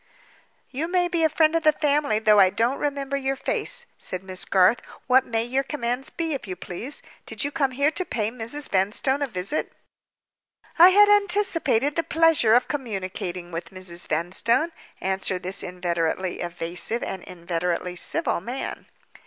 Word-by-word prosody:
"You 290 Hz, +5 st, -2 dB
may 355 Hz, 0 st, +2 dB
be 340 Hz, -2 st, 0 dB
a 320 Hz, -, +5 dB
friend 315 Hz, +1 st, +3 dB
of 330 Hz, -, +2 dB
the 310 Hz, -1 st, +5 dB
family, 295 Hz, -6 st, +1 dB
though 215 Hz, -1 st, +5 dB
I 190 Hz, -1 st, +7 dB
don't 235 Hz, +7 st, 0 dB
remember 280 Hz, -1 st, -2 dB
your 270 Hz, 0 st, -1 dB
face," 485 Hz, -, -3 dB
said 185 Hz, 0 st, -5 dB
Miss 185 Hz, -1 st, -6 dB
Garth. 195 Hz, +5 st, +4 dB, 0.3 s
"What 260 Hz, 0 st, +4 dB
may 225 Hz, -1 st, 0 dB
your 255 Hz, +3 st, 0 dB
commands 260 Hz, -2 st, -3 dB
be, 330 Hz, -2 st, -3 dB
if 270 Hz, -, -5 dB
you 185 Hz, -, -4 dB
please? 225 Hz, +12 st, -6 dB, 0.2 s
Did -, -, -3 dB
you 285 Hz, -, -2 dB
come 290 Hz, -3 st, +1 dB
here 280 Hz, +4 st, +1 dB
to 370 Hz, -, -2 dB
pay 220 Hz, -, -2 dB
Mrs. 250 Hz, +5 st, -5 dB
Vanstone 210 Hz, +9 st, +1 dB
a 285 Hz, -, +1 dB
visit?" 195 Hz, +5 st, -3 dB, 1.1 s
"I 350 Hz, +2 st, +10 dB
had 410 Hz, +2 st, +7 dB
anticipated 385 Hz, -, +2 dB
the 330 Hz, -, +2 dB
pleasure 325 Hz, -9 st, +4 dB
of 245 Hz, -, +3 dB
communicating 185 Hz, -9 st, -4 dB
with 165 Hz, 0 st, -5 dB
Mrs. 185 Hz, -2 st, -5 dB
Vanstone," 190 Hz, -, +1 dB, 0.3 s
answered 190 Hz, -1 st, -1 dB
this 185 Hz, +2 st, -2 dB
inveterately 175 Hz, 0 st, -2 dB
evasive 175 Hz, +6 st, -3 dB
and 190 Hz, -, -4 dB
inveterately 175 Hz, 0 st, -3 dB
civil 175 Hz, -, 0 dB
man. 245 Hz, +8 st, -5 dB
235 Hz, 165 wpm, -24 LUFS, 185-295 Hz, 1.1 s, I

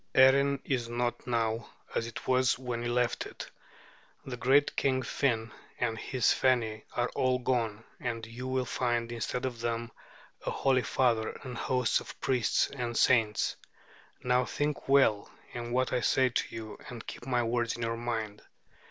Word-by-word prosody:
Erin 140 Hz, +1 st, +6 dB
is 120 Hz, -4 st, -1 dB
not 120 Hz, 0 st, -2 dB
now 115 Hz, -1 st, 0 dB, 0.2 s
as 115 Hz, -, -1 dB
it 115 Hz, -, -8 dB
was 130 Hz, 0 st, +3 dB
when 125 Hz, -2 st, -4 dB
you 120 Hz, 0 st, -2 dB
left 120 Hz, 0 st, 0 dB
it. -, -, -9 dB, 0.7 s
The 130 Hz, -, -4 dB
great 135 Hz, +4 st, +3 dB
king 130 Hz, -1 st, +1 dB
Finn 115 Hz, -5 st, 0 dB, 0.3 s
and 115 Hz, -2 st, 0 dB
his 125 Hz, +1 st, +1 dB
Feni 115 Hz, -4 st, +1 dB
are 120 Hz, 0 st, +1 dB
all 130 Hz, -1 st, +1 dB
gone; 115 Hz, -4 st, -1 dB, 0.2 s
and 115 Hz, -2 st, -3 dB
you 120 Hz, +3 st, -7 dB
will 130 Hz, 0 st, 0 dB
find, 120 Hz, -2 st, -1 dB
instead 125 Hz, +2 st, -2 dB
of 125 Hz, -3 st, -4 dB
them, 115 Hz, 0 st, -2 dB, 0.5 s
a -, -, -2 dB
holy 130 Hz, -2 st, +2 dB
father 115 Hz, -4 st, +1 dB
and 125 Hz, -2 st, -6 dB
hosts 125 Hz, 0 st, +1 dB
of -, -, -11 dB
priests 125 Hz, -4 st, +2 dB
and 120 Hz, -4 st, -3 dB
saints. 110 Hz, -4 st, +3 dB, 0.7 s
Now, 125 Hz, 0 st, +3 dB
think 145 Hz, +2 st, -2 dB
well 135 Hz, -7 st, +4 dB, 0.2 s
on 120 Hz, 0 st, -5 dB
what 130 Hz, +1 st, +1 dB
I 125 Hz, -, +1 dB
say 130 Hz, +1 st, +3 dB
to 120 Hz, -, 0 dB
you, 110 Hz, -2 st, -7 dB
and 120 Hz, -2 st, -8 dB
keep 120 Hz, -, -8 dB
my 125 Hz, -2 st, +2 dB
words 115 Hz, 0 st, 0 dB
in 120 Hz, -, -5 dB
your 115 Hz, 0 st, -1 dB
mind. 115 Hz, -3 st, -3 dB
120 Hz, 170 wpm, -30 LUFS, 115-130 Hz, 0.7 s, Erin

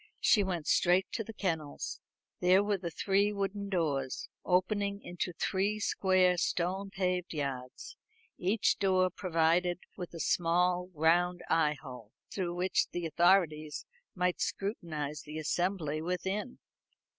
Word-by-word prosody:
She 210 Hz, -, +4 dB
went 175 Hz, -5 st, -2 dB
straight 180 Hz, +5 st, +3 dB
to 225 Hz, -, -2 dB
the 225 Hz, -, -8 dB
kennels. 165 Hz, -9 st, -3 dB, 0.4 s
There 185 Hz, +2 st, +5 dB
were 205 Hz, -1 st, 0 dB
the 175 Hz, -2 st, -4 dB
three 200 Hz, +4 st, +1 dB
wooden 200 Hz, 0 st, -3 dB
doors, 145 Hz, -8 st, -1 dB
opening 200 Hz, +2 st, +1 dB
into 175 Hz, +1 st, -3 dB
three 195 Hz, +5 st, -1 dB
square 185 Hz, -3 st, +3 dB
stone 185 Hz, +3 st, -1 dB
paved 180 Hz, -3 st, -2 dB
yards, 130 Hz, -3 st, -5 dB, 0.4 s
each 205 Hz, +4 st, +1 dB
door 185 Hz, -2 st, +3 dB
provided 175 Hz, 0 st, +1 dB, 0.2 s
with 175 Hz, -2 st, -7 dB
a -, -, -6 dB
small 180 Hz, +2 st, +1 dB
round 175 Hz, +3 st, +2 dB
eye 155 Hz, -3 st, +3 dB
hole, 125 Hz, -5 st, -11 dB, 0.2 s
through 175 Hz, -3 st, -2 dB
which 180 Hz, +1 st, +1 dB
the 175 Hz, -1 st, -4 dB
authorities 160 Hz, -2 st, +2 dB, 0.3 s
might 180 Hz, -1 st, 0 dB
scrutinise 155 Hz, -8 st, -3 dB
the 150 Hz, +1 st, -8 dB
assembly 155 Hz, -1 st, -1 dB
within. 190 Hz, +7 st, -3 dB
180 Hz, 130 wpm, -31 LUFS, 160-195 Hz, 0.4 s, There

